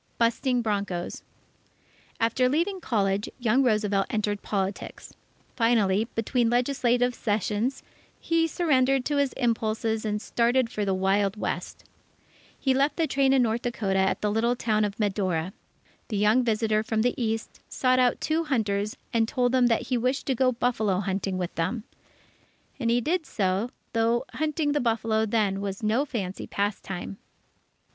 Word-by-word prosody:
Busting 240 +1 +1
Broncos 200 -5 -2 1.0
After 250 +3 +2
leaving 355 +7 0
college, 200 -5 0
young 245 +1 +2
Roosevelt 210 -5 +1
entered 210 -1 -1
politics. 195 -1 -4 0.4
Finally, 220 -3 +2
between 230 +1 +1
legislative 245 0 +2
sessions, 215 +3 -1 0.4
he 330 0 +1
surrendered 270 -6 +2
to 290 - 0
his 280 -2 +2
impulses 225 -2 -1
and 210 -1 -1
started 235 +2 +1
for 210 -3 -2
the 195 -1 +1
Wild 195 +2 +1
West. - - -4 0.8
He 265 - +2
left 275 +3 +2
the 330 - +2
train 275 -3 +2
in 265 -2 +4
North 230 0 0
Dakota 205 -6 -1
at 190 0 +1
the 210 - +1
little 235 +3 +1
town 215 -3 +1
of 200 0 -5
Medora. 190 -4 -1 0.5
The 215 - -3
young 215 +5 +4
visitor 220 -2 +1
from 220 0 -1
the 245 - +2
East, 225 -2 -3
sought 255 0 +2
out 250 -1 +3
two 320 +1 0
hunters 210 -6 -1 0.2
and 225 -1 +2
told 245 0 +1
them 255 -1 +4
that 230 -2 0
he 250 -2 +1
wished 255 +3 -1
to 270 - +1
go 255 +1 +2
buffalo 230 -6 0
hunting 195 -1 -2
with 180 -2 -3
them. 195 +7 -2 1.0
And 235 -3 0
he 240 +1 +3
did 325 +3 -1
so, 195 +2 0 0.2
though 230 +1 +1
hunting 305 -1 0
the 290 - +1
buffalo 225 -2 +1
then 205 -3 0
was 200 +1 -4
no 225 +7 +2
fancy 200 -9 -4
pastime. 195 - -3
225 Hz, 155 wpm, -26 LUFS, 205-255 Hz, 1.0 s, in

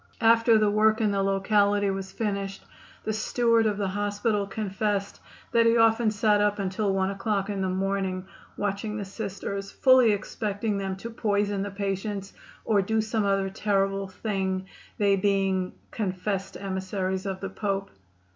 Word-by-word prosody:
After 230 0 +5
the 210 -1 +3
work 215 +1 +3
in 215 -2 +2
the 200 -1 +1
locality 200 +1 +2
was 195 0 -5
finished, 200 -2 -3 0.4
the 220 - -1
steward 230 +1 +2
of 210 -2 -1
the 200 -2 -1
hospital 205 +1 -1
confessed 200 0 -2 0.3
that 230 0 +4
he 230 +1 +4
often 225 0 +4
sat 210 0 +2
up 205 0 +2
until 195 +1 -1
1 190 0 +1
o'clock 200 0 -1
in 195 -1 -2
the 190 - 0
morning 190 0 -1 0.3
watching 205 +1 -2
the 205 - -4
Sisters, 195 -1 -5
fully 255 -4 +5
expecting 205 0 -2
them 195 -1 -2
to 230 +5 -7
poison 205 -3 0
the 205 - -2
patients, 195 0 -3 0.3
or 210 -3 +3
do 220 +3 0
some 215 -1 0
other 195 -1 +1
terrible 195 -1 0
thing, 190 -1 -2 0.3
they 200 -1 +3
being 195 -1 +1 0.2
"confessed 195 -1 -3
emissaries 190 0 -3
of 190 -1 -3
the 195 - -4
Pope." 195 -1 -2
200 Hz, 155 wpm, -27 LUFS, 195-215 Hz, 0.4 s, After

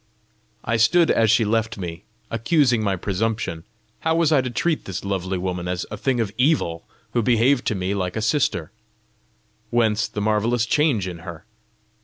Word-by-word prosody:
I 115 0 +1
stood 135 +10 +4
as 110 -1 +3
she 115 +1 +4
left 110 +1 0
me, 85 -1 -6 0.3
accusing 120 +1 +2
my 100 -2 +1
presumption: 100 -3 -2 0.3
how 160 0 0
was 165 -2 +2
I 145 -4 +5
to 130 - -3
treat 160 +6 -1
this 95 0 -5
lovely 95 -1 -2
woman 90 -1 -3
as 90 0 -2
a - - -3
thing 125 +4 0
of 110 -4 -1
evil, 125 - +1 0.3
who 120 - +2
behaved 120 +3 +2
to 110 - +1
me 95 +1 -2
like 90 -3 -2
a 110 - -1
sister? 135 +5 0 1.0
Whence 110 -2 +2
the - - -6
marvellous 110 +3 +1
change 130 - +1
in 90 -2 -6
her? 85 0 -9
110 Hz, 175 wpm, -22 LUFS, 95-120 Hz, 1.0 s, I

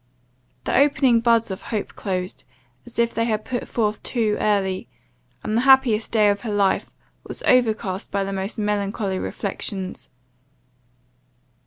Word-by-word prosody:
The - - -1
opening 275 -4 +4
buds 230 -2 +2
of 190 - -5
hope 215 -3 -3
closed, 185 -2 -4 0.4
as 240 - -12
if 235 0 +2
they 230 - 0
had 215 -2 -1
put 245 -1 -3
forth 215 -2 -1
too 220 -4 0
early, 195 -3 0 0.5
and 215 - -2
the - - +2
the - - +3
happiest 265 -5 +5
day 215 -2 +4
of 200 0 +1
her 225 -1 -5
life 200 -2 +1 0.4
was - - -6
overcast 220 -6 +2
by 200 -1 0
the 195 0 -4
most 195 +3 -3
melancholy 200 -2 -1
reflections. 190 -1 -5
215 Hz, 150 wpm, -23 LUFS, 195-230 Hz, 0.5 s, happiest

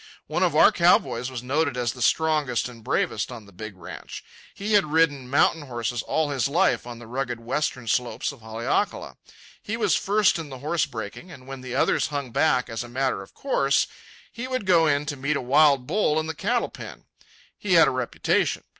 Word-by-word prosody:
One - - -2
of - - +2
our - - +7
cow - - +5
boys 120 +2 -5
was 125 -2 -6
noted 145 +1 0
as 120 -2 -1
the 125 - -10
strongest 150 -1 +1
and 120 -3 -12
bravest 105 +2 -1
on 115 -4 -9
the 100 - -17
big 105 +1 -9
ranch. 90 - -9 0.3
He 210 +2 -3
had 195 -8 +3
ridden 145 -5 +2
mountain 155 +3 +3
horses 120 -1 -3
all 155 -2 -1
his 135 -1 0
life 165 -3 +1
on 120 -1 -7
the 120 - -11
rugged 125 0 -3
western 125 0 -2
slopes 125 +6 -1
of 140 -4 -15
Haleakala. 110 +1 -2 0.4
He 225 +2 -4
was 230 - +2
first 205 -3 +2
in 160 -3 -7
the 130 - -8
horse 155 +5 0
breaking; 110 - -7
and 130 -5 -12
when 135 0 -8
the 130 -1 -6
others - - +2
hung 140 -4 -4
back, 140 -1 +2
as 115 -1 -4
a 120 - -10
matter 130 -4 -1
of 95 - -14
course, 140 - +1 0.5
he 235 +2 -6
would 255 -5 -3
go 170 -3 +4
in 145 0 +1
to 150 -1 -3
meet 140 +3 -1
a - - 0
wild 140 0 +4
bull 160 -1 +1
in 155 - -2
the 160 - -3
cattle - - -1
pen. - - -10 0.5
He - - -2
had - - +7
a - - +2
reputation. - - 0
135 Hz, 210 wpm, -25 LUFS, 120-155 Hz, 0.5 s, our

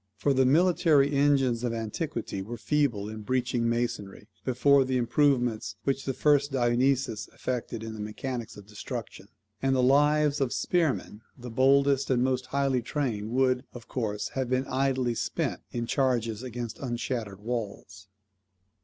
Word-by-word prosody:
For 135 +8 +2
the 130 -1 +3
military 155 -2 +4
engines 135 -4 +2
of 120 -2 -1
antiquity 115 -2 -4
were 115 +5 -6
feeble 130 -10 0
in 110 0 -7
breaching 120 0 0
masonry, 115 -4 -3 0.2
before 135 +2 +4
the 130 0 0
improvements 120 -5 +1
which 135 0 -1
the 135 - -1
first 145 -1 +3
Dionysius 125 -2 +1
effected 120 -3 -4
in 110 -1 -6
the 110 - -9
mechanics 115 +3 -5
of 105 - -11
destruction; 105 0 -7 0.3
and 135 0 +2
the 130 - +2
lives 145 +2 +3
of 130 -3 0
spearmen 155 - 0 0.2
the 125 -1 -8
boldest 135 +2 +3
and 125 -2 +2
most 130 -1 0
highly 135 -2 +1
trained 120 -5 -2
would, 130 +1 +2
of 120 -1 -10
course, 105 -5 -3
have 130 -2 -3
been 130 +1 +1
idly 130 -2 0
spent 115 0 -2
in 120 -1 -2
charges 120 -4 0
against 120 -2 -6
unshattered 120 -5 -3
walls. 105 -4 -5
125 Hz, 150 wpm, -28 LUFS, 115-135 Hz, 0.3 s, military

